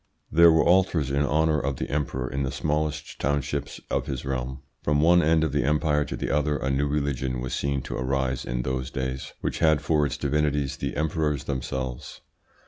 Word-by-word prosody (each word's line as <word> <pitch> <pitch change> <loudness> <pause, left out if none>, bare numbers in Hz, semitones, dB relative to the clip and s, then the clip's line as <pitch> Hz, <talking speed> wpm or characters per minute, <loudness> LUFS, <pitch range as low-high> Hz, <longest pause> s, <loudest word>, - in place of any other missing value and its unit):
There 85 +1 +7
were 80 - +4
altars 85 -6 +3
in 70 +1 +1
honour 75 +2 +2
of 70 -1 -2
the - - -4
Emperor 70 -3 -2
in 65 +2 -3
the 65 -1 -1
smallest 75 +1 -2
townships 70 0 -2
of - - 0
his 65 0 -4
realm. 65 0 -3 0.2
"From 75 0 +1
one 85 +3 +5
end 80 0 +3
of 80 - 0
the 70 +1 +1
Empire 75 0 +2
to - - -5
the - - -2
other 75 0 +1
a 65 +1 -1
new 70 +2 +1
religion 70 -3 -1
was 65 0 -4
seen 70 -1 -1
to - - -5
arise 65 0 -1
in - - -2
those 65 +1 -2
days 65 -1 -4
which - - -2
had 80 -2 +4
for 75 -1 +2
its - - -4
divinities 75 -1 0
the - - -4
emperors 75 -2 0
themselves. 65 -2 -4
70 Hz, 200 wpm, -26 LUFS, 65-75 Hz, 0.2 s, There